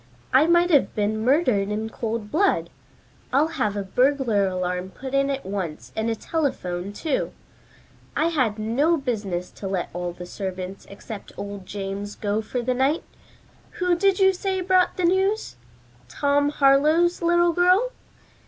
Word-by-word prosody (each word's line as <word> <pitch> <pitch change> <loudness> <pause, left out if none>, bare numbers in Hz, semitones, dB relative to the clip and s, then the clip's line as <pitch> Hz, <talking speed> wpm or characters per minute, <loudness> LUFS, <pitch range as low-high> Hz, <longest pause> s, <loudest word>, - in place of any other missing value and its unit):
"I 275 +5 +6
might 345 +1 +4
have 290 -4 +3
been 215 0 0
murdered 250 -7 +2
in 215 +1 -2
cold 220 -2 -4
blood. 395 +6 +1 0.6
I'll 290 +5 +3
have 210 -10 -1
a 200 - -1
burglar 245 -1 +2
alarm 180 0 -2
put 265 +7 -8
in 275 0 +2
at 275 -1 -3
once 165 - -5
and 220 +1 -1
a 225 - 0
telephone, 200 - -2
too. 285 +7 -2 0.8
I 320 - +2
had 255 -10 0
no 265 +10 +2
business 205 - -3
to 195 - -7
let 190 -2 -2
all 175 0 -3
the 175 +1 -9
servants 185 0 -6
except 200 +1 -9
old 200 -2 -7
James 200 +1 -5
go 210 +1 -1
for 240 +3 -4
the 255 +1 +1
night. 270 +6 +1 0.7
Who 360 -1 +1
did 385 +2 +3
you 385 0 +5
say 380 +1 -2
brought 370 0 +2
the 365 - +1
news? 385 - +1 0.5
Tom 285 - +1
Harlowe's 300 +6 +3
little 345 0 +3
girl? 365 +8 +3
250 Hz, 155 wpm, -24 LUFS, 200-330 Hz, 0.8 s, I